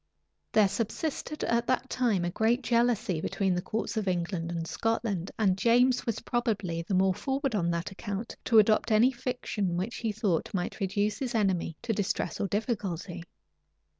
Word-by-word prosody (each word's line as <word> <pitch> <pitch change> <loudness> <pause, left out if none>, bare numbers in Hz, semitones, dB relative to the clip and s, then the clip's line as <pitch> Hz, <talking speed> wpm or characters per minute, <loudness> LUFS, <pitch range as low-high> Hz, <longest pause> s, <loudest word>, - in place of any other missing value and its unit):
} - - -51
There 215 -2 +6
subsisted 250 +9 -3
at 235 +1 +1
that 255 0 +1
time 225 -10 +1
a 175 - -1
great 230 +6 +1
jealousy 235 -8 +1
between 195 +1 0
the 180 - 0
courts 220 +4 -3
of 210 -2 -1
England 175 -1 -1
and 165 -1 -3
Scotland; 215 -2 -1
and 195 -4 +3
James 245 +4 +3
was 230 - -1
probably 210 -9 -1
the 180 +3 -2
more 190 0 +4
forward 270 +4 -2
on 175 -5 +1
that 170 +1 -2
account 205 +2 -5
to 230 - +4
adopt 215 +2 +4
any 225 +4 +5
fiction 240 -7 -2
which 195 +7 -3
he 225 -2 -1
thought 200 -4 -1
might 180 -1 -3
reduce 205 +2 0
his 255 -3 -2
enemy 185 -6 0
to 235 -1 0
distress 200 -3 -2
or 200 - 0
difficulty. 195 -5 -2
210 Hz, 175 wpm, -29 LUFS, 185-235 Hz, -, There